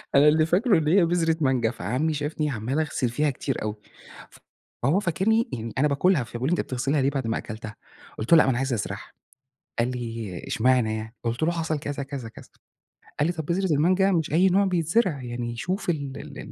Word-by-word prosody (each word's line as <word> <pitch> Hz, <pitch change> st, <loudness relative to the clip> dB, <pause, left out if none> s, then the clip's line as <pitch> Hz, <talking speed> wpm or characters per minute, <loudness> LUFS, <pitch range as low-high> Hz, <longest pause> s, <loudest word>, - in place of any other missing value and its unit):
أنا 145 Hz, +2 st, +7 dB
اللي 155 Hz, +1 st, +5 dB
فاكره 195 Hz, +5 st, +3 dB
إن 155 Hz, -2 st, 0 dB
هي 175 Hz, +3 st, +5 dB
بذرة 165 Hz, -1 st, +1 dB
مانجا، 130 Hz, -5 st, +2 dB
فعمي 125 Hz, -, -1 dB
شافني 150 Hz, +1 st, -2 dB
عمال 130 Hz, +4 st, -2 dB
أغسل 145 Hz, -5 st, -1 dB
فيها 150 Hz, +5 st, +1 dB
كتير 135 Hz, 0 st, -3 dB
أوي، 105 Hz, 0 st, -3 dB, 1.1 s
فهو 150 Hz, +10 st, +3 dB
فاكرني 205 Hz, +5 st, +1 dB
يعني 115 Hz, -2 st, -4 dB
أنا 145 Hz, +3 st, +4 dB
باكلها، 145 Hz, 0 st, +2 dB
فبيقول 120 Hz, +4 st, -3 dB
لي: -, -, 0 dB
"أنت -, -, +1 dB
بتغسلها 135 Hz, +3 st, -1 dB
ليه 135 Hz, -, +3 dB
بعد 135 Hz, -4 st, -2 dB
ما 115 Hz, -, 0 dB
أكلتها،" 110 Hz, -1 st, -7 dB, 0.4 s
قلت 110 Hz, -, -4 dB
له: -, -, +10 dB
"لأ -, -, +7 dB
ما -, -, +2 dB
أنا 120 Hz, -, -1 dB
عايز 135 Hz, -1 st, -1 dB
أزرعها،" 105 Hz, -, -4 dB, 0.7 s
قال 120 Hz, +2 st, +1 dB
لي: 115 Hz, -6 st, -5 dB
"اشمعنى 115 Hz, -2 st, +2 dB
يعني" 110 Hz, +2 st, -8 dB
قلت 120 Hz, +5 st, -1 dB
له 170 Hz, -, +3 dB
حصل 160 Hz, -3 st, -2 dB
كذا، 145 Hz, -2 st, -4 dB
كذا، 135 Hz, -4 st, -6 dB
كذا، -, -, -14 dB, 0.7 s
قال 150 Hz, -, +3 dB
لي: -, -, +1 dB
"طب 160 Hz, -2 st, -4 dB
بذرة 180 Hz, 0 st, +1 dB
المانجا 185 Hz, +6 st, +3 dB
مش 160 Hz, -4 st, 0 dB
أي 185 Hz, +4 st, +5 dB
نوع 195 Hz, +2 st, +3 dB
بيتزرع 175 Hz, -, +1 dB
يعني 120 Hz, -1 st, -4 dB
شوف 185 Hz, -, -2 dB
ال 140 Hz, -5 st, -3 dB
ال -, -, -9 dB
145 Hz, 205 wpm, -25 LUFS, 120-165 Hz, 1.1 s, له